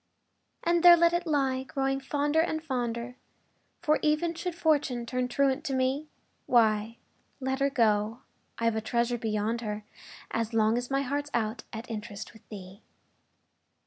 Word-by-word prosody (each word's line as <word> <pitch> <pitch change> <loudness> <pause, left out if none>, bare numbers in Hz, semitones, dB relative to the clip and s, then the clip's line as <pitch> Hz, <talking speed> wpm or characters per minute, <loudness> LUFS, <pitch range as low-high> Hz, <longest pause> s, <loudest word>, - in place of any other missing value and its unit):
And 340 0 +2
there 350 0 +9
let 340 0 +4
it 345 0 -1
lie, 270 -4 +1
growing 270 0 -1
fonder 290 +3 +1
and, 315 -2 -2
fonder 245 -3 -3 0.7
For, 305 0 +3
even 305 +3 +1
should 340 +1 -4
Fortune 290 -8 +1
turn 250 +1 -1
truant 275 +3 +1
to 270 - -1
me, 260 +4 0 0.4
Why, 225 -1 +3 0.4
let 265 0 -2
her 275 0 +2
go 225 -2 +1 0.4
I've 230 -1 +1
a 220 - -1
treasure 235 +1 0
beyond 220 +1 -1
her, 210 -2 -4 0.5
As 225 0 -2
long 220 0 +3
as 245 0 -2
my 275 0 +1
heart's 285 +2 -2
out 225 0 -2
at 225 +2 -7
interest 215 -2 -7
With 220 - -19
thee! 195 0 -10
250 Hz, 155 wpm, -28 LUFS, 225-290 Hz, 0.7 s, there